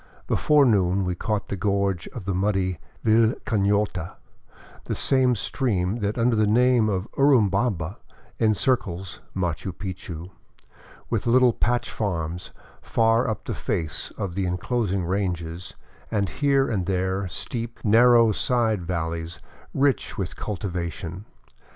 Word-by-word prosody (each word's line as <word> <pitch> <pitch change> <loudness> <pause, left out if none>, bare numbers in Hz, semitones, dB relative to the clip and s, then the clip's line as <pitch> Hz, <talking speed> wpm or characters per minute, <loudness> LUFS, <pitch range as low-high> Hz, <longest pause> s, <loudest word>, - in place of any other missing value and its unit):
Before 150 -2 +4
noon 95 -4 +2
we 90 - -1
caught 105 +3 -2
the - - -2
gorge 100 -2 0
of 120 -8 -8
the 95 - -1
muddy 95 -2 0 0.3
Vilcanota, 105 -4 +1 0.7
the - - -2
same 130 -2 +2
stream 100 -4 -1
that 105 0 -2
under 115 0 +3
the 110 -1 +3
name 120 0 +4
of 95 0 -1
Uru 135 -6 +5
bamba 95 -4 -1 0.4
encircles 105 -5 0 0.2
Machu 90 -1 -2
Picchu, 90 -1 -7 0.8
with 115 -1 -1
little 125 0 +5
patch 120 +2 0
farms 90 -4 -3 0.3
far 115 +1 +2
up 110 - -4
the - - -3
face 80 -3 -3
of 95 -4 -3
the 95 0 -1
enclosing 95 0 -1
ranges 90 -2 -3 0.3
and 100 -3 0
here 140 -1 +2
and 95 -6 -1
there 95 +1 0
steep, 115 +6 -5
narrow 115 +1 +6
side 110 -2 +1
valleys 85 -1 -3 0.3
rich 135 -2 0
with 95 -4 -3
cultivation. 90 -1 -4
100 Hz, 125 wpm, -24 LUFS, 90-115 Hz, 0.8 s, narrow